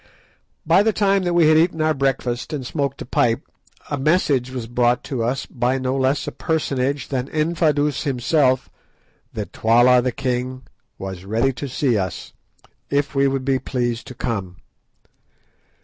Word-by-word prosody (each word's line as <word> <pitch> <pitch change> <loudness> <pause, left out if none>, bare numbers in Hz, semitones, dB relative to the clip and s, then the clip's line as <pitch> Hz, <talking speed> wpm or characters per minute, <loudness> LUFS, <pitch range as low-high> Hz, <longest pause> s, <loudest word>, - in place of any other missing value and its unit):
By - - +5
the 220 +1 +2
time 200 -1 +2
that 175 -1 0
we 170 -3 +5
had 155 0 +6
eaten 165 0 +1
our 155 0 +2
breakfast, 135 -2 -1
and 140 -4 -4
smoked 140 0 -2
a - - -12
pipe, 120 -1 +1 0.5
a 145 - -1
message 140 -4 +2
was 130 -3 -5
brought 120 +1 +1
to 125 -5 -3
us 125 +4 -1
by 125 +2 -1
no 130 0 -1
less 135 +1 +1
a - - -4
personage 140 -3 -1
than 130 -2 -2
Infadoos 155 -2 +1
himself 130 -1 +1 0.7
that - - -5
Twala 120 +3 +5
the 125 +1 -1
king 130 +1 -3 0.3
was 95 -1 -6
ready 115 +7 0
to 140 +3 -5
see 125 -3 +1
us, 95 -3 -5 0.6
if 140 0 0
we 140 0 +3
would 135 -1 -2
be 135 -1 +2
pleased 120 -2 -2
to 130 - -9
come. 100 -8 -3
130 Hz, 165 wpm, -21 LUFS, 120-145 Hz, 0.7 s, had